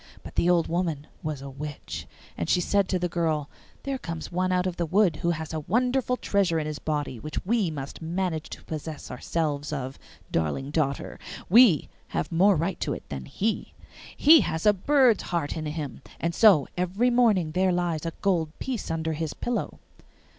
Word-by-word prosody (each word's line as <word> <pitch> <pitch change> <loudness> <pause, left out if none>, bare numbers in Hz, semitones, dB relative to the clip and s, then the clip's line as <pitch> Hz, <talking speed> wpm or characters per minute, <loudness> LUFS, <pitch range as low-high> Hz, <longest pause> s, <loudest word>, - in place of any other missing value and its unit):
But - - -9
the 175 - +2
old 175 -2 +3
woman 165 -4 -1 0.2
was 150 -3 -4
a 140 - -6
witch, 145 +1 -6 0.3
and 85 - -3
she - - +4
said 200 +2 +1
to 185 - +1
the 180 0 0
girl, 160 -4 -1 0.3
'There 275 -1 -2
comes 165 -4 -6
one 185 +1 0
out 180 0 +2
of 185 -2 -2
the 170 - -1
wood 185 -1 +3
who 170 - 0
has 160 -1 -3
a 160 - -1
wonderful 250 - +1
treasure 195 -8 +1
in 155 - -1
his 150 -1 -4
body 145 -5 -2
which 155 +8 -5
we 215 -3 +2
must 140 -1 -6
manage 165 -1 -2
to - - -9
possess 155 -1 -6
ourselves 145 +1 -2
of, 135 -2 -4 0.3
darling 85 - -1
daughter; 145 -3 -1 0.3
we 210 - +6 0.2
have 80 - -3
more 190 +4 +5
right 170 +3 -1
to - - -1
it - - -8
than 65 -2 -5
he. 215 - -2 0.4
He 310 +2 +8
has 160 +4 -2
a 210 - +7
bird's 250 +3 +4
heart 170 -5 -2
in 155 -1 -3
him, 150 -3 -5 0.2
and 170 0 -1
so 190 -8 +6
every 190 +8 +1
morning 215 -10 +3
there 185 +3 +2
lies 175 -3 0
a 165 -1 -3
gold 165 -5 0
piece 255 -5 -4
under 160 0 -1
his 155 0 -3
pillow. 240 0 -3
165 Hz, 190 wpm, -26 LUFS, 150-190 Hz, 0.4 s, He